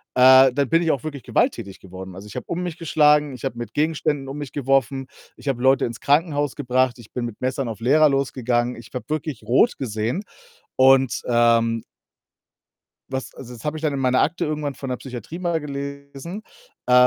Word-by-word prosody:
äh, 130 Hz, +1 st, +8 dB
dann 140 Hz, 0 st, 0 dB
bin 165 Hz, +1 st, +4 dB
ich 165 Hz, -, +2 dB
auch 135 Hz, -, -2 dB
wirklich 145 Hz, -4 st, -6 dB
gewalttätig 95 Hz, -1 st, -1 dB
geworden. 95 Hz, 0 st, -10 dB
Also, 100 Hz, +3 st, -10 dB
ich -, -, -12 dB
habe -, -, -5 dB
um 170 Hz, -, -3 dB
mich 175 Hz, -2 st, -4 dB
geschlagen, 150 Hz, -3 st, +3 dB
ich 125 Hz, -, -10 dB
habe 125 Hz, -3 st, -3 dB
mit 120 Hz, -2 st, -6 dB
Gegenständen 150 Hz, -2 st, 0 dB
um 135 Hz, +2 st, -6 dB
mich 145 Hz, -3 st, -6 dB
geworfen, 135 Hz, -1 st, 0 dB, 0.3 s
ich -, -, -13 dB
habe 130 Hz, -3 st, -1 dB
Leute 135 Hz, +1 st, +4 dB
ins 115 Hz, -1 st, -6 dB
Krankenhaus 145 Hz, -1 st, +1 dB
gebracht, 130 Hz, -2 st, +1 dB
ich 115 Hz, -, -14 dB
bin 125 Hz, -1 st, -3 dB
mit 115 Hz, -3 st, -7 dB
Messern 130 Hz, +1 st, -1 dB
auf 115 Hz, -2 st, -6 dB
Lehrer 150 Hz, +6 st, +4 dB
losgegangen. 125 Hz, -3 st, 0 dB
Ich 115 Hz, -1 st, -12 dB
habe 125 Hz, -, -5 dB
wirklich 155 Hz, -4 st, -3 dB
rot 125 Hz, -, +3 dB
gesehen. 115 Hz, -, -2 dB, 0.5 s
Und, 135 Hz, -1 st, +4 dB
ähm 115 Hz, -1 st, +3 dB, 1.3 s
was 130 Hz, -1 st, -5 dB
also, 125 Hz, -1 st, -10 dB
das 115 Hz, -, -13 dB
habe 150 Hz, +1 st, -2 dB
ich 155 Hz, -, -8 dB
dann 155 Hz, -2 st, +1 dB
in 140 Hz, -, -2 dB
meiner 130 Hz, -1 st, +2 dB
Akte 175 Hz, 0 st, 0 dB
irgendwann 150 Hz, -2 st, -3 dB
von 135 Hz, -, -6 dB
'ner 125 Hz, -, -1 dB
Psychiatrie 125 Hz, +5 st, -8 dB
mal 170 Hz, -2 st, 0 dB
gelesen. 140 Hz, +5 st, -7 dB, 0.4 s
Äh, 125 Hz, -, +1 dB
135 Hz, 200 wpm, -22 LUFS, 120-150 Hz, 1.3 s, äh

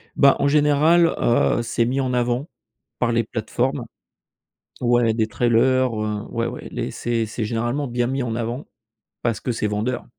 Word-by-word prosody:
Bah, 140 Hz, 0 st, +6 dB
en 140 Hz, -, +1 dB
général, 150 Hz, +3 st, +4 dB
heu, 120 Hz, 0 st, +2 dB
c'est 115 Hz, 0 st, 0 dB
mis 130 Hz, +3 st, -1 dB
en 130 Hz, -1 st, -1 dB
avant 125 Hz, +4 st, 0 dB, 0.5 s
par 120 Hz, -1 st, +1 dB
les 115 Hz, 0 st, +2 dB
plateformes. 120 Hz, +4 st, -2 dB, 1.0 s
Ouais 120 Hz, -2 st, +3 dB
des 110 Hz, -1 st, +1 dB
trailers, 125 Hz, +2 st, +2 dB
heu, 105 Hz, -1 st, -2 dB
ouais, 115 Hz, 0 st, -2 dB
ouais, -, -, -7 dB
les -, -, -3 dB
c'est 115 Hz, -1 st, -1 dB
c'est 110 Hz, +1 st, -4 dB
généralement 120 Hz, +6 st, -1 dB
bien 120 Hz, 0 st, -1 dB
mis 135 Hz, +1 st, -1 dB
en 115 Hz, -2 st, -3 dB
avant 120 Hz, +3 st, -3 dB, 0.6 s
parce 115 Hz, -3 st, 0 dB
que 125 Hz, -, -2 dB
c'est 110 Hz, -, -1 dB
vendeur. 110 Hz, +5 st, -2 dB
120 Hz, 170 wpm, -22 LUFS, 115-130 Hz, 1.0 s, Bah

